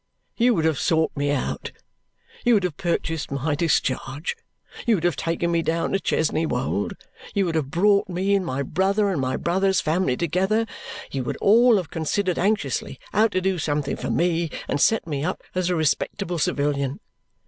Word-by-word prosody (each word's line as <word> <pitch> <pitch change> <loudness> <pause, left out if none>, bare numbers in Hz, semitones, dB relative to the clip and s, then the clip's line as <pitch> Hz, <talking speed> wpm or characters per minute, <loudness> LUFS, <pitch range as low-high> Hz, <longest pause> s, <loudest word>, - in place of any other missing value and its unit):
You 240 0 +3
would 160 - +1
have 160 -3 +1
sought 160 -1 +2
me 145 0 0
out; 145 -2 -2 0.7
you 240 -2 +5
would 200 - +2
have 180 -5 -1
purchased 165 -2 -2
my 140 +2 -1
discharge; 145 - 0 0.5
you 230 - +5
would 170 - -3
have 175 -4 +2
taken 170 +1 -1
me 170 -1 +2
down 165 +1 -1
to 195 - +1
Chesney 160 -3 0
Wold; 125 -7 -1 0.4
you 200 -1 +2
would 170 - -1
have 155 -4 -1
brought 200 +5 +3
me 185 +3 0
and 195 -1 +2
my 140 -4 -2
brother 195 +7 +1
and 160 -7 -1
my 130 0 -1
brother's 190 +2 +1
family 155 -5 +1
together; 190 +7 +1 0.5
you 135 -2 -2
would - - -3
all 230 +2 +5
have 175 -6 -4
considered 180 +3 -1
anxiously 205 +3 -1
how 220 - +5
to 185 - -1
do 185 -1 0
something 145 -2 -1
for - - -5
me 170 -1 +1 0.2
and 145 - -1
set 225 - +3
me 145 -3 -3
up 180 - -3
as 185 -1 0
a 180 - +1
respectable 170 +3 -1
civilian. 140 -2 0
170 Hz, 185 wpm, -24 LUFS, 145-195 Hz, 0.7 s, you